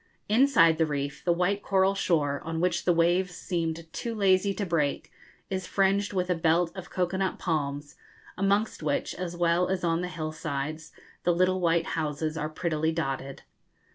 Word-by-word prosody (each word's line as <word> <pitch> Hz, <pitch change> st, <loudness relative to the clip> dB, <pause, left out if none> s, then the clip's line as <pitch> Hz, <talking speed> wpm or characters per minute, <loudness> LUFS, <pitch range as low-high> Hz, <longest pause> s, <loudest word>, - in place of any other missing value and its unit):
Inside 210 Hz, -, +5 dB
the 160 Hz, -, +3 dB
reef, 140 Hz, -1 st, -3 dB
the 175 Hz, -, +2 dB
white 180 Hz, +4 st, +1 dB
coral 195 Hz, -1 st, +2 dB
shore, 150 Hz, -7 st, 0 dB
on 165 Hz, 0 st, -3 dB
which 175 Hz, 0 st, 0 dB
the 180 Hz, -, +4 dB
waves 175 Hz, +2 st, +2 dB
seemed 165 Hz, -2 st, -3 dB
too 230 Hz, -1 st, -4 dB
lazy 195 Hz, -1 st, +3 dB
to 200 Hz, +1 st, -3 dB
break, 155 Hz, -5 st, -1 dB, 0.4 s
is 190 Hz, -1 st, -2 dB
fringed 195 Hz, +1 st, +1 dB
with 180 Hz, -2 st, -1 dB
a -, -, +5 dB
belt 165 Hz, +1 st, +1 dB
of 190 Hz, -2 st, -8 dB
cocoa 180 Hz, 0 st, -1 dB
nut 190 Hz, -1 st, -1 dB
palms, 145 Hz, -3 st, -3 dB, 0.4 s
amongst 200 Hz, +2 st, +1 dB
which, 150 Hz, -2 st, -1 dB
as 175 Hz, -1 st, -5 dB
well 175 Hz, +1 st, +2 dB
as 185 Hz, -1 st, -2 dB
on 165 Hz, 0 st, +1 dB
the 180 Hz, -, -2 dB
hill 155 Hz, -3 st, -4 dB
sides, 155 Hz, 0 st, -4 dB, 0.3 s
the 175 Hz, -, +2 dB
little 185 Hz, +1 st, +2 dB
white 165 Hz, -1 st, +2 dB
houses 155 Hz, 0 st, -2 dB
are 155 Hz, -1 st, -2 dB
prettily 160 Hz, -1 st, -1 dB
dotted. 135 Hz, -4 st, -4 dB
170 Hz, 175 wpm, -27 LUFS, 160-185 Hz, 0.4 s, Inside